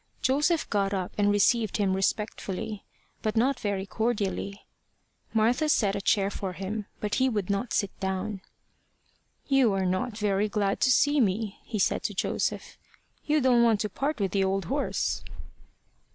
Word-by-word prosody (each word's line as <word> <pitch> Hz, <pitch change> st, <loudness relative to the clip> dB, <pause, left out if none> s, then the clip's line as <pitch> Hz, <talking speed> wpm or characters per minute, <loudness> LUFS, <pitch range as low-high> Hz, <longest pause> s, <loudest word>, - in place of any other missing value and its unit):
Joseph 295 Hz, +5 st, +2 dB
got 200 Hz, -1 st, +1 dB
up 185 Hz, -2 st, -3 dB
and 205 Hz, -1 st, +2 dB
received 210 Hz, +1 st, +2 dB
him 200 Hz, -3 st, +1 dB
respectfully, 210 Hz, +1 st, -2 dB, 0.4 s
but 215 Hz, -1 st, -1 dB
not 250 Hz, +3 st, +2 dB
very 200 Hz, -3 st, -2 dB
cordially. 200 Hz, -2 st, -2 dB, 0.7 s
Martha 235 Hz, +7 st, +2 dB
set 205 Hz, -8 st, +2 dB
a 200 Hz, -, -2 dB
chair 195 Hz, 0 st, +2 dB
for 190 Hz, -2 st, -4 dB
him, 200 Hz, +3 st, -4 dB
but 210 Hz, -1 st, -3 dB
he 260 Hz, -, +4 dB
would 205 Hz, -5 st, -1 dB
not 200 Hz, +4 st, -2 dB
sit 200 Hz, -, 0 dB
down. 190 Hz, +1 st, -3 dB, 1.0 s
"You 270 Hz, -6 st, +3 dB
are 190 Hz, -1 st, 0 dB
not 210 Hz, +5 st, -1 dB
very 210 Hz, -1 st, +1 dB
glad 200 Hz, -1 st, 0 dB
to 255 Hz, -, +4 dB
see 290 Hz, +3 st, +4 dB
me," 210 Hz, -1 st, -1 dB
he 220 Hz, -, -4 dB
said 195 Hz, -, +1 dB
to -, -, -2 dB
Joseph. -, -, -2 dB, 0.5 s
"You 300 Hz, 0 st, +3 dB
don't 250 Hz, -2 st, +4 dB
want 225 Hz, -3 st, +3 dB
to 210 Hz, -, -1 dB
part 280 Hz, +7 st, -2 dB
with 195 Hz, -3 st, 0 dB
the 195 Hz, 0 st, +2 dB
old 190 Hz, -1 st, 0 dB
horse." 280 Hz, -, -1 dB
210 Hz, 165 wpm, -27 LUFS, 195-235 Hz, 1.0 s, he